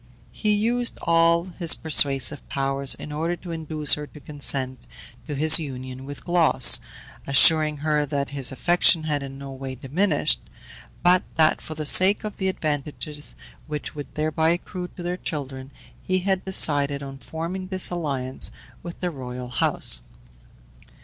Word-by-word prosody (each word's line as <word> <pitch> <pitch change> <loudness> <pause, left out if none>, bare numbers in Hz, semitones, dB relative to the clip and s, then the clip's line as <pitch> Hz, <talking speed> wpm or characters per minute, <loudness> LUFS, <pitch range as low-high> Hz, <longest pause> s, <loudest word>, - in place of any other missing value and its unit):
He 215 - -1
used 235 +4 0
all 170 0 +3 0.2
his 170 -2 +4
persuasive 140 -2 +2
powers 135 0 0
in 150 - -9
order 165 +4 -2
to 175 0 -9
induce 155 -2 +1
her 150 0 -2
to 150 - -14
consent 135 -3 0 0.5
to 150 - -4
his 155 +3 +6
union 130 -3 -7
with 145 0 -9
Glauce, 165 -7 +4 0.5
assuring 155 +2 +6
her 150 -1 +2
that 140 -1 -3
his 140 -2 0
affection 175 +3 +3
had 150 -2 -1
in 135 0 -8
no 140 0 -8
way 135 0 -7
diminished, 145 - +1 0.6
but 180 +1 +5
that 155 -1 +3
for 155 - -8
the 155 0 -5
sake 190 +8 +4
of 215 -1 -6
the 190 - -1
advantages 150 -2 -4 0.3
which 150 -1 -5
would 145 -1 -9
thereby 155 +1 +1
accrue 180 +1 -3
to 175 - -8
their 175 +1 -3
children, 135 -5 -6 0.3
he 185 - 0
had 190 0 -1
decided 145 -6 +3
on 135 0 -8
forming 170 +6 -5
this 185 -1 0
alliance 135 -7 -3 0.3
with 170 0 -9
the 180 -1 -1
royal 125 -3 -7
house. 125 - +1
150 Hz, 155 wpm, -24 LUFS, 140-170 Hz, 0.6 s, his